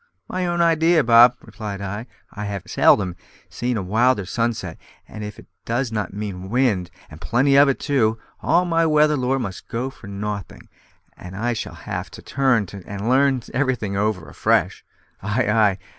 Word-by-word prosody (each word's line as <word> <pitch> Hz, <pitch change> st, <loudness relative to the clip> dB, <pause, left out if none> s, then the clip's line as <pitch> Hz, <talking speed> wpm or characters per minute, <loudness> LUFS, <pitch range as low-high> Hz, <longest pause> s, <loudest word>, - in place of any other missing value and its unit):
"My 185 Hz, -1 st, -2 dB
own 175 Hz, 0 st, 0 dB
idea, 165 Hz, -1 st, +4 dB
Bob," 120 Hz, +1 st, +7 dB
replied 105 Hz, -4 st, -7 dB
I; 105 Hz, +4 st, -5 dB, 0.3 s
"I 105 Hz, +1 st, -5 dB
have 100 Hz, -2 st, -4 dB
seldom 90 Hz, -4 st, +3 dB, 0.3 s
seen 120 Hz, -1 st, -2 dB
a 100 Hz, -, -2 dB
wilder 110 Hz, +2 st, +2 dB
sunset, 110 Hz, -4 st, -2 dB, 0.3 s
and 110 Hz, -, -8 dB
if 105 Hz, 0 st, -7 dB
it -, -, -13 dB, 0.2 s
does 120 Hz, +1 st, -1 dB
not 105 Hz, -2 st, -2 dB
mean 95 Hz, -2 st, -6 dB
wind, 110 Hz, -7 st, +1 dB, 0.2 s
and 75 Hz, +2 st, -12 dB
plenty 135 Hz, +4 st, +2 dB
of 140 Hz, 0 st, +7 dB
it 135 Hz, -, 0 dB
too, 115 Hz, -6 st, +1 dB, 0.2 s
all 175 Hz, +2 st, +2 dB
my 165 Hz, -1 st, +2 dB
weather 150 Hz, -1 st, +4 dB
lore 130 Hz, 0 st, 0 dB
must 100 Hz, -8 st, -5 dB
go 125 Hz, +3 st, -3 dB
for 100 Hz, -, -14 dB
nothing, 100 Hz, -1 st, -6 dB, 0.5 s
and 90 Hz, +1 st, -10 dB
I 120 Hz, +3 st, 0 dB
shall 110 Hz, -, -5 dB
have -, -, -5 dB
to -, -, -13 dB
turn 130 Hz, -6 st, +1 dB
to 100 Hz, -, -8 dB
and 100 Hz, +2 st, -5 dB
learn 135 Hz, -1 st, +3 dB
everything 120 Hz, -7 st, -1 dB
over 100 Hz, -4 st, -1 dB
afresh." -, -, 0 dB, 0.4 s
"Ay, 105 Hz, +5 st, 0 dB
ay! 105 Hz, -3 st, +3 dB
115 Hz, 175 wpm, -22 LUFS, 100-135 Hz, 0.5 s, Bob